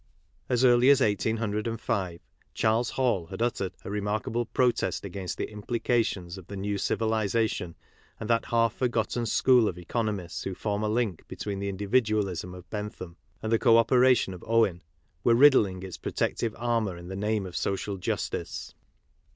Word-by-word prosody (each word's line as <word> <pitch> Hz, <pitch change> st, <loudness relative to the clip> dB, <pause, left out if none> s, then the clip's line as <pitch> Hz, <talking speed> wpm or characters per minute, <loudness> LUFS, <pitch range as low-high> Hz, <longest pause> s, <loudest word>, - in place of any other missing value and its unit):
As 125 Hz, 0 st, +2 dB
early 120 Hz, +1 st, +6 dB
as 140 Hz, -1 st, +7 dB
1805, 105 Hz, -4 st, -1 dB, 0.3 s
Charles 115 Hz, +1 st, +2 dB
Hall 120 Hz, -10 st, 0 dB
had -, -, -8 dB
uttered 100 Hz, -6 st, -1 dB
a -, -, -5 dB
remarkable 105 Hz, +3 st, -2 dB
protest 125 Hz, -4 st, 0 dB
against 95 Hz, -1 st, -5 dB
the -, -, -4 dB
implications 105 Hz, -4 st, -1 dB
of 90 Hz, -, -14 dB
the 100 Hz, -, -7 dB
new 100 Hz, +1 st, -2 dB
civilization 110 Hz, -5 st, 0 dB, 0.4 s
and 110 Hz, -, -5 dB
that 115 Hz, 0 st, +2 dB
half 115 Hz, -1 st, +2 dB
forgotten 120 Hz, -1 st, -1 dB
school 125 Hz, -1 st, +4 dB
of 90 Hz, -, -3 dB
economists 90 Hz, -3 st, -3 dB
who 95 Hz, -, -4 dB
form 105 Hz, +1 st, -2 dB
a 105 Hz, -, 0 dB
link 110 Hz, -5 st, -1 dB
between 100 Hz, -2 st, -5 dB
the 100 Hz, 0 st, -2 dB
individualism 100 Hz, -3 st, 0 dB
of 90 Hz, 0 st, -12 dB
Bentham 105 Hz, -5 st, -6 dB, 0.3 s
and 110 Hz, -, -2 dB
the 115 Hz, -, +3 dB
co 115 Hz, -2 st, +6 dB
operation 125 Hz, -3 st, +4 dB
of 90 Hz, -, -10 dB
Owen, 110 Hz, -6 st, +2 dB, 0.4 s
were 120 Hz, -, +5 dB
riddling 110 Hz, -9 st, +5 dB
its 95 Hz, -2 st, -7 dB
protective 115 Hz, -2 st, -2 dB
armour 115 Hz, -6 st, 0 dB
in 85 Hz, 0 st, -10 dB
the 95 Hz, -, -6 dB
name 105 Hz, 0 st, -1 dB
of 90 Hz, -1 st, -8 dB
social 100 Hz, 0 st, -2 dB
justice. 90 Hz, -, -4 dB
105 Hz, 160 wpm, -27 LUFS, 95-115 Hz, 0.4 s, as